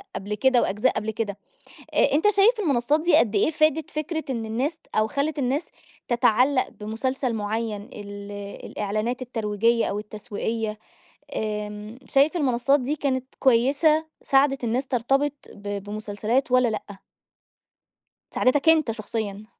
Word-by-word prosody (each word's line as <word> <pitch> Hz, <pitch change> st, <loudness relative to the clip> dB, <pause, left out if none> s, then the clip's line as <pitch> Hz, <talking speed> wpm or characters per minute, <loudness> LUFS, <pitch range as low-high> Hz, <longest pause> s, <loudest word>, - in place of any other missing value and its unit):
قبل 205 Hz, +2 st, -4 dB
كده 255 Hz, +2 st, +3 dB
وأجزاء 210 Hz, +6 st, +1 dB
قبل 220 Hz, +1 st, -2 dB
كده، 205 Hz, -2 st, -3 dB, 0.6 s
أ 280 Hz, -, +3 dB
أنت 300 Hz, +6 st, +2 dB
شايف 440 Hz, +4 st, +5 dB
المنصات 290 Hz, -, +2 dB
دي 335 Hz, -1 st, +4 dB
قدّ 225 Hz, -7 st, +2 dB
إيه 205 Hz, +10 st, +3 dB
فادت 310 Hz, 0 st, +1 dB
فكرة 315 Hz, +1 st, -3 dB
إن 230 Hz, -4 st, -2 dB
الناس 255 Hz, +9 st, -1 dB
ت -, -, -32 dB
أو 215 Hz, 0 st, +3 dB
خلت 285 Hz, +4 st, -1 dB
الناس 275 Hz, +5 st, 0 dB, 0.4 s
تتعلق 250 Hz, +2 st, +3 dB
بمسلسل 245 Hz, +4 st, -3 dB
معيّن، 215 Hz, 0 st, -2 dB
ال 205 Hz, 0 st, -8 dB, 0.4 s
الإعلانات 215 Hz, +5 st, -2 dB
الترويجية، 230 Hz, -1 st, +1 dB
أو 205 Hz, -, -2 dB
التسويقية 215 Hz, +1 st, -4 dB, 0.6 s
آمم، 210 Hz, +1 st, -4 dB
شايف 285 Hz, +5 st, +3 dB
المنصات 275 Hz, -1 st, +2 dB
دي 275 Hz, +4 st, -2 dB
كانت 260 Hz, -2 st, -2 dB
كويسة 280 Hz, +5 st, +3 dB, 0.2 s
ساعدت 275 Hz, -1 st, +2 dB
الناس 245 Hz, +4 st, 0 dB
ترتبط 270 Hz, +4 st, +1 dB, 0.2 s
ب 205 Hz, -1 st, -5 dB
بمسلسلات 215 Hz, +5 st, -2 dB
والّا 255 Hz, -1 st, +5 dB
لأ؟ 205 Hz, -2 st, -5 dB, 1.3 s
ساعدتك 275 Hz, +5 st, +2 dB
أنت 310 Hz, -7 st, +4 dB
شخصيًا. 215 Hz, -1 st, -5 dB
240 Hz, 135 wpm, -24 LUFS, 215-280 Hz, 1.3 s, شايف